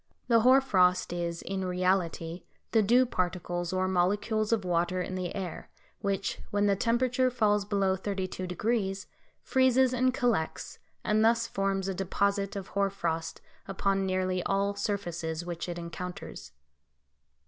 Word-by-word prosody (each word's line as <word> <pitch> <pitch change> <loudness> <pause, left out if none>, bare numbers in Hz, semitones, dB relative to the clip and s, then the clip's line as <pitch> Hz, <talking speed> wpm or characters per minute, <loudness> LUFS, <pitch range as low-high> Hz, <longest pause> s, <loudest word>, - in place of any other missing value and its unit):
The 230 -1 +6
hoar 255 +4 +6
frost 180 -8 +2
is 170 -1 -3
in 190 +1 -3
reality 180 -2 0 0.3
the 225 - +4
dew 240 +5 +4
particles 175 -4 -2
or 185 0 0
molecules 205 +4 +1
of 220 -4 +1
water 175 +1 0
in 180 +1 -3
the 185 -1 -3
air, 185 -5 -5 0.3
which, 200 0 -2
when 205 0 +1
the 200 -1 +3
temperature 250 +4 +2
falls 210 -4 +2
below 195 -2 +1
32°, 195 +1 -2 0.4
freezes 260 -1 +3
and 255 +1 +2
collects, 240 - -1 0.2
and 215 +1 +2
thus 230 +1 +3
forms 195 -2 -1
a 195 - -1
deposit 200 +2 0
of 195 -1 -6
hoar 200 0 +1
frost 165 -4 -3 0.3
upon 195 0 0
nearly 185 -1 0
all 200 +1 +1
surfaces 175 -5 -3
which 175 0 -5
it 175 - -4
encounters. 170 - -7
195 Hz, 140 wpm, -29 LUFS, 180-210 Hz, 0.4 s, The